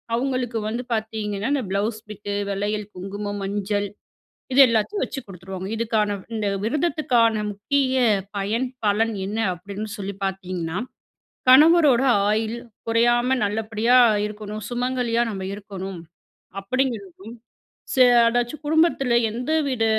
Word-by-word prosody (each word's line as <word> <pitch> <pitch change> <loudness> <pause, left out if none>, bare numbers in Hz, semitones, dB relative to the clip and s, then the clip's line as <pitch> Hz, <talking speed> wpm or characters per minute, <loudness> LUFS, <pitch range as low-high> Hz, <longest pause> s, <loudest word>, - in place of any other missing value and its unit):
அவுங்களுக்கு 250 -2 -1
வந்து 235 +3 -3
பாத்தீங்கன்னா, 220 -1 -2
இந்த 275 -3 0
ப்ளவுஸ் 210 +3 -1
பிட்டு 205 -1 -6 0.2
வளயில், 205 +2 -2
குங்குமம், 205 +2 -5
மஞ்சள். 205 +1 -1 0.7
இது 265 - +5
எல்லாத்தயும் 230 - 0
வச்சு 270 - -6
குடுத்துருவாங்க. 190 0 -7
இதுக்கான 215 -2 0 0.2
இந்த 215 -2 -2 0.2
விரதத்துக்கான 255 -4 +2 0.2
முக்கிய 260 +6 0 0.4
பயன், 215 +6 -1 0.2
பலன் 220 +3 +2
என்ன 210 +3 -3 0.2
அப்டீன்னு 200 +4 -7
சொல்லி 200 0 -4
பாத்தீங்கன்னா, 185 -3 -3 0.7
கணவரோட 295 -2 +7 0.3
ஆயுள் 220 +2 0 0.3
குறையாம 240 +3 +3
நல்லபடியா 220 +3 +2 0.3
இருக்கணும், 210 0 -7
சுமங்கலியா 245 -1 0
நம்ம 195 -3 -5
இருக்கணும் 195 -3 -7 0.6
அப்டீங்குறதும், 220 -3 -3 0.6
ஸ - - -5 0.3
அதாச்சும் 245 +5 -2
குடும்பத்துல 310 -5 +2 0.2
எந்தவித 260 0 0
220 Hz, 110 wpm, -23 LUFS, 205-250 Hz, 0.7 s, கணவரோட